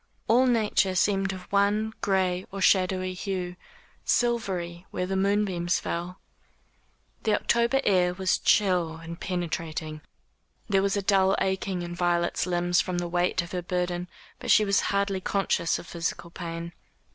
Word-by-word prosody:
All 250 +3 +5
nature 210 -5 +2
seemed 195 0 +2
of 185 -1 -7
one 205 +2 +2
gray 185 -2 0
or 195 - -5
shadowy 185 -1 +2
hue 180 -1 -4 0.5
silvery 190 -8 -1
where 180 - -2
the 190 +1 -2
moonbeams 190 -3 +1
fell. 175 +2 -4 1.0
The 215 -1 +2
October 235 +5 +2
air 180 -3 +3
was 190 0 +1
chill 180 -5 +2
and 165 +1 -9
penetrating. 160 -3 -4 0.7
There 195 -2 +3
was 200 +1 +1
a 200 - -1
dull 190 0 +3
aching 190 -1 -1
in 175 0 -5
Violet's 175 0 0
limbs 175 0 +2
from 180 -1 -3
the 175 0 -1
weight 175 +1 +1
of 170 - -11
her 180 - -2
burden, 180 0 -2 0.3
but - - -6
she 215 - +6
was 200 -1 +3
hardly 200 -1 0
conscious 195 -3 0
of - - -9
physical 170 0 -4
pain. 170 -1 -6
185 Hz, 150 wpm, -27 LUFS, 175-200 Hz, 1.0 s, she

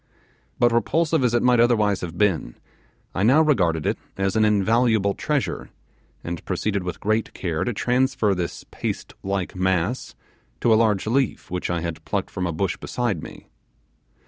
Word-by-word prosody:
But 120 -1 +4
repulsive 155 +6 +1
as 120 -1 +2
it 120 - +2
might 125 -1 +4
otherwise 105 -4 +3
have 85 -1 -6
been, 90 -12 +1 0.6
I - - -2
now 135 +10 +5
regarded 90 - +2
it - - 0 0.2
as 95 +1 0
an 110 - +4
invaluable 105 0 +3
treasure, 150 +3 -2 0.5
and 85 -1 -5
proceeded 100 -2 -1
with 90 -1 -5
great 110 +2 -1
care 85 -4 -2
to 120 - -1
transfer 125 -2 +1
this 90 -2 -4
paste - - -4
like 95 -2 -3
mass 95 +5 -1 0.5
to 115 - +4
a 110 - +5
large 105 -4 +1
leaf 125 -3 0
which 90 0 -2
I 85 -1 -1
had 85 -1 -5
plucked - - -3
from 90 -1 -2
a - - -1
bush 95 +5 -1
beside 115 -10 -2
me. - - -11
105 Hz, 170 wpm, -23 LUFS, 90-120 Hz, 0.6 s, now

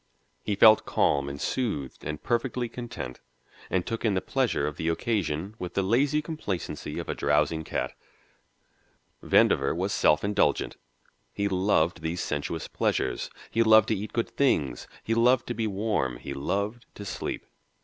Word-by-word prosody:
He 105 - -1
felt 110 +2 +7
calm 70 -1 +2
and 70 0 -6
soothed 75 - -2
and 75 0 -5
perfectly 120 0 0
content, 115 - -7 0.5
and 90 -1 0
took 115 -1 -4
in 110 -4 +2
the - - +2
pleasure 130 - 0
of 75 0 -4
the 80 - -2
occasion 90 -1 -1
with 90 -1 -6
the 100 - +2
lazy 140 +9 +2
complacency 150 - -4
of - - -4
a - - -1
drowsing 75 +2 +1
cat. - - -3 1.3
Vandover 70 +2 +4
was 95 +3 -1
self 75 -4 +3
indulgent 100 0 +1 0.6
he 100 - -1
loved 90 -3 +1
these 80 +2 -2
sensuous 75 +2 -3
pleasures, - - -1 0.2
he 115 - +2
loved 110 -1 +6
to 110 - +2
eat 105 +2 -5
good 115 - -1
things, 75 - +1 0.2
he 115 - 0
loved 120 +2 +4
to - - -3
be 110 0 -1
warm, 100 - -1
he 70 - -6
loved 100 +11 -2
to 100 - -8
sleep. 90 - -4
100 Hz, 160 wpm, -27 LUFS, 80-115 Hz, 1.3 s, felt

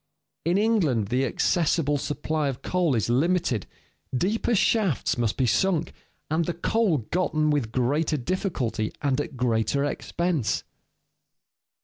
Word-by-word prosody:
In 175 +3 +2
England 170 - +2
the 130 +2 +1
accessible 150 0 +1
supply 150 +1 -2
of 135 -2 -4
coal 175 -7 +1
is 110 - 0
limited, 140 - +1 0.5
deeper 220 - +1
shafts 200 - +2
must 115 -3 -1
be 130 - +2
sunk, 170 - +1 0.4
and 160 +1 +1
the 175 - -3
coal 200 -1 +1
gotten 155 -4 +1
with 135 -7 0
greater 145 +6 +1
difficulty 125 - -2
and 140 -1 +1
at 145 -2 -7
greater 125 +3 +1
expense. 165 -2 -1
150 Hz, 125 wpm, -25 LUFS, 125-175 Hz, 0.5 s, In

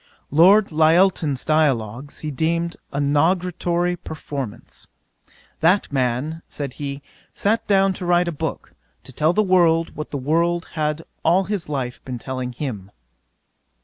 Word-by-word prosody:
'Lord 190 +7 +6
Lyttelton's 160 -2 +3
Dialogues, 140 -4 0
he 155 - -4
deemed 170 +4 -1 0.2
a 140 - -3
nugatory 175 +4 +1
performance. 140 -8 -7 0.7
"That 180 -1 +2
man, 135 +5 -1
(said 140 -3 -5
he,) 140 0 -5 0.3
sat 220 +3 0
down 195 -1 +3
to 180 -1 -6
write 175 0 +3
a - - 0
book, 150 - -5 0.3
to 130 - -12
tell 155 +5 +2
the 215 - +3
world 170 -4 +3
what 155 - -5
the 145 - -3
world 170 +5 0
had 155 0 -2 0.2
all 180 +4 +3
his 190 -4 -4
life 130 -4 -4
been 130 -2 -5
telling 130 0 -5
him." 115 -8 -5
155 Hz, 140 wpm, -22 LUFS, 140-175 Hz, 0.7 s, Lord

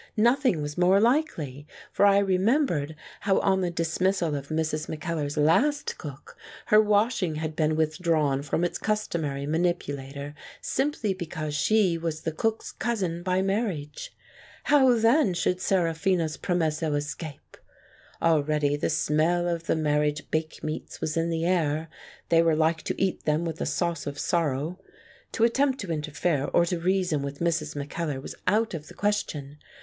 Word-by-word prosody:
Nothing 240 - +3
was 150 +3 -5
more 185 +2 +5
likely, 170 - 0 0.2
for 205 - +4
I 200 0 +5
remembered 195 - +1 0.2
how 195 -1 +2
on 190 -1 +2
the 180 - 0
dismissal 170 0 0
of 140 -1 -4
Mrs. 155 0 -2
Mackellar's 155 -2 -3
last 250 - +2
cook, 145 -1 -9 0.3
her 215 0 +6
washing 210 -5 +1
had 155 0 -4
been 155 -1 +1
with 155 -1 0
drawn 155 -6 +1
from 150 +4 -1
its 175 - -1
customary 160 -10 -2
manipulator, 145 -4 -2 0.3
simply 265 -7 -1
be 180 -3 -6
cause 155 -1 -4
she 180 +2 +2
was 160 -2 -3
the 160 - -2
cook's 220 +8 -2
cousin 190 -8 -2
by 185 +1 +1
marriage. 195 -8 -2 0.5
How 265 -4 +5
then 230 - +3
should 180 +1 0
Seraphina's 170 -2 +1
promesso 160 -3 0
escape? 145 0 -6 0.7
Already 150 -3 +2
the 145 - -1
smell 170 +4 +1
of 170 -1 -3
the - - +2
marriage 150 -1 0
bake 155 0 -2
meats 155 0 -5
was 155 - -2
in 165 0 0
the 165 0 -1
air: 160 -3 0 0.4
they 165 -1 +5
were 165 -1 +3
like 160 +1 +1
to - - -3
eat 195 -1 -1
them 155 +2 +1
with 165 -1 -4
a - - -1
sauce 170 -3 -1
of 145 0 -5
sorrow. 160 +1 -1 0.5
To 225 - +1
attempt 265 +3 +2
to 195 -4 -5
interfere 150 -1 -1
or 170 - +3
to 175 0 -2
reason 180 -4 +1
with 140 0 -5
Mrs. 160 -3 -1
Mackellar 145 0 -3
was 135 - -7
out 220 +3 +2
of 155 -2 -6
the - - -13
question. 150 -9 -2
165 Hz, 160 wpm, -26 LUFS, 150-190 Hz, 0.7 s, her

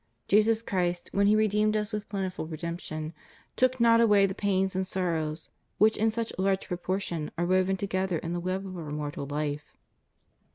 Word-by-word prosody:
Jesus 220 +2 +3
Christ, 175 -4 -1
when 200 0 +3
He 210 - +5
redeemed 215 0 +2
us 210 +1 -2
with 210 -1 -4
plentiful 190 -5 -3
redemption, 160 -1 -5 0.4
took 255 0 +2
not 230 0 +6
away 205 -3 +5
the 190 - -2
pains 195 -1 0
and 190 0 -1
sorrows 160 -4 -2 0.3
which 220 +1 +5
in 220 +1 +2
such 230 +1 -3
large 190 0 +1
proportion 175 -3 -2
are 175 - +1
woven 185 +1 +2
together 190 -2 -1
in 165 +2 -4
the 175 - -1
web 185 +2 -2
of 185 -1 -7
our 165 -4 -6
mortal 145 -1 -4
life. 145 0 -4
190 Hz, 175 wpm, -28 LUFS, 170-210 Hz, 0.4 s, not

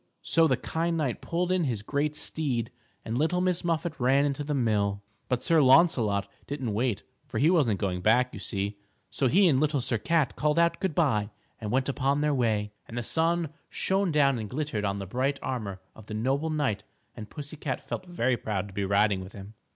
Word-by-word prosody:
So 165 0 +4
the - - +2
kind 165 +1 -1
knight 140 -7 -1
pulled 175 +2 -1
in 185 -3 +2
his 115 -6 -2
great 145 +5 -1
steed 125 -8 -2 0.3
and 115 +2 -2
Little 165 +4 +1
Miss 180 -1 +1
Muffet 170 -1 -1
ran 135 +3 +3
into 145 0 -1
the 145 0 -2
mill. 105 -5 0 0.3
But 125 -2 0
Sir 165 -2 +4
Launcelot 130 - +4 0.2
didn't 135 -6 -3
wait, 115 -1 0 0.2
for - - -5
he 155 +5 +4
wasn't 125 - +2
going 90 -2 -1
back, 125 +5 +3
you 105 - -7
see, 100 +1 -3 0.3
so 135 - +1
he 190 +8 +5
and 135 -6 +3
Little 150 -1 +1
Sir 120 -2 -1
Cat 160 +1 +1
called 150 +1 +1
out 170 0 +3
good 190 -6 -1
by 115 -11 +2 0.3
and 105 - -5
went 130 +1 +1
upon 140 +1 0
their 150 0 +2
way. 110 -5 0 0.2
And 115 - -8
the 120 - -1
sun 165 +3 +1 0.2
shone 190 -1 0
down 140 -4 +3
and 105 -2 -5
glittered 130 -7 -2
on 100 0 -1
the 100 - -5
bright 130 +8 -1
armor 110 -8 -3 0.2
of 110 -1 -14
the 105 - -5
noble 135 +8 0
knight 145 -10 0 0.3
and 110 -3 -8
pussy 145 0 -8
cat 145 -3 -4
felt 185 - -5
very 130 -8 0
proud 100 -3 -3
to - - -13
be 100 - -2
riding 100 0 +2
with 95 +1 -10
him. 100 +1 -10
130 Hz, 215 wpm, -28 LUFS, 105-155 Hz, 0.3 s, he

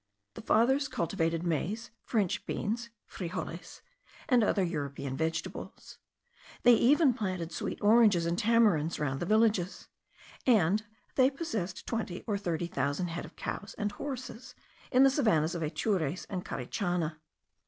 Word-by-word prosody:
The - - -8
fathers 265 +6 +3
cultivated 165 - -1
maize, 180 +7 -2
French 205 -7 0
beans 235 +3 -2 0.2
(frijoles), 175 -1 -6 0.5
and 250 -6 +4
other 200 -2 +2
European 140 -5 -3
vegetables; 160 +3 -4 0.6
they 245 - +8
even 270 +4 +5
planted 185 -7 -3
sweet - - -4
oranges 210 -5 +5
and 170 +1 0
tamarinds 205 -7 +3
round 135 -2 -1
the 175 - -3
villages; 215 -4 +1 0.6
and 210 -3 +4 0.3
they 260 0 +5
possessed 225 - -4
twenty 220 -6 -3
or 210 - -1
thirty 175 -3 -2
thousand 145 +2 -1
head 170 +1 -4
of - - -14
cows 205 - -5
and 210 0 -1
horses, 255 0 -7 0.4
in 255 +1 +6
the 270 - +6
savannahs 170 - +2
of 170 - -4
Atures 160 +1 -1
and 185 -2 -3
Carichana. 170 - -2
190 Hz, 135 wpm, -30 LUFS, 165-230 Hz, 0.6 s, they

